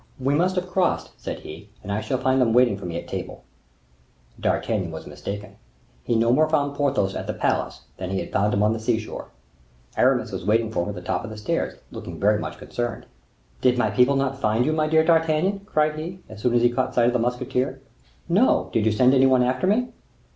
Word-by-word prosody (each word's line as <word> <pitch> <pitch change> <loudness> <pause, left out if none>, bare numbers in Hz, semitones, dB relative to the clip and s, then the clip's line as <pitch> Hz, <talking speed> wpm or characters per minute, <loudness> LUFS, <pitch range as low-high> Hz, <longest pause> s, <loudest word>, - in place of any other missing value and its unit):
"We 135 +2 +1
must 180 +5 +2
have 180 0 -1
crossed," 180 0 0
said - - -5
he, 80 +7 -10
"and 100 - -5
I 105 +2 -1
shall 110 +4 -1
find 130 +1 +2
them 115 -3 +3
waiting 125 -3 +4
for 100 -2 -7
me 85 -1 -4
at - - -7
table." - - -6 1.0
D'Artagnan - - 0
was - - -8
mistaken. 100 0 -7 0.5
He 120 - 0
no 115 +1 +3
more 155 +3 +3
found 145 -2 +1
Porthos 135 -9 +1
at - - -5
the - - -3
palace - - -1 0.2
than 95 - -5
he 95 0 -1
had - - -6
found 105 +1 +1
him 100 - +1
on 105 +1 +3
the 115 - -4
sea 110 +1 +1
shore. 110 - -7 0.7
Aramis - - +2
was - - -5
waiting 110 +1 +1
for 85 - 0
him - - -4
at 105 - -5
the 90 - -8
top - - -2
of 115 - -6
the 110 - -8
stairs, 105 - -2
looking - - -8
very 105 +1 +3
much - - -5
concerned. 120 -2 -4 0.6
"Did 125 -1 +3
my 125 - +1
people 130 +2 +4
not 135 0 -1
find 110 +3 +2
you, 155 - +1
my 155 -1 +1
dear 160 0 +4
D'Artagnan?" 165 +4 +2
cried 155 -4 +1
he, 170 +4 -6
as 105 -1 -11
soon 120 +1 +1
as 120 - +3
he 120 - +4
caught 130 +1 -1
sight 120 - +4
of 120 - +2
the 125 - +1
musketeer. 125 +2 -1 0.5
"No; 195 +9 +3
did 110 -1 +2
you - - +4
send 125 +4 +4
any 135 0 +5
one 130 -1 +4
after 130 +7 0
me?" 245 +5 +2
125 Hz, 235 wpm, -24 LUFS, 110-150 Hz, 1.0 s, any